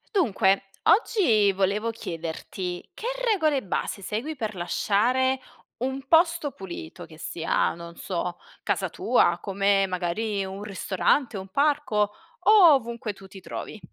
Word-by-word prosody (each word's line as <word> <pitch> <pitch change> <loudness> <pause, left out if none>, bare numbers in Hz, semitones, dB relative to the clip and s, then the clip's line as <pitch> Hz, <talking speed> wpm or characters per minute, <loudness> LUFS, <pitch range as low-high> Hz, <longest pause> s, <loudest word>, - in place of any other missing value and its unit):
Dunque, 200 - +3 0.3
oggi 245 - +4
volevo 200 +4 0
chiederti 175 -1 -6
che - - -8 0.3
regole 310 -9 +2
base 195 0 -3
segui 225 +11 -3
per 220 -6 -4
lasciare 240 +9 +1 0.4
un 265 +2 -3
posto 330 -1 +3
pulito 175 -3 -8
che 160 -1 -15
sia, 165 +1 0
non 170 0 -10
so, 175 -2 -3 0.3
casa - - 0
tua, 245 - +2
come 195 0 +2
magari 195 +3 -2
un 190 +1 -6
ristorante, 210 +4 0
un 190 0 -7
parco 275 -5 +1 0.3
o 365 -4 +7
ovunque 235 -4 -2
tu 195 0 -14
ti 190 +1 -12
trovi. 200 +3 -7
210 Hz, 130 wpm, -26 LUFS, 190-265 Hz, 0.4 s, o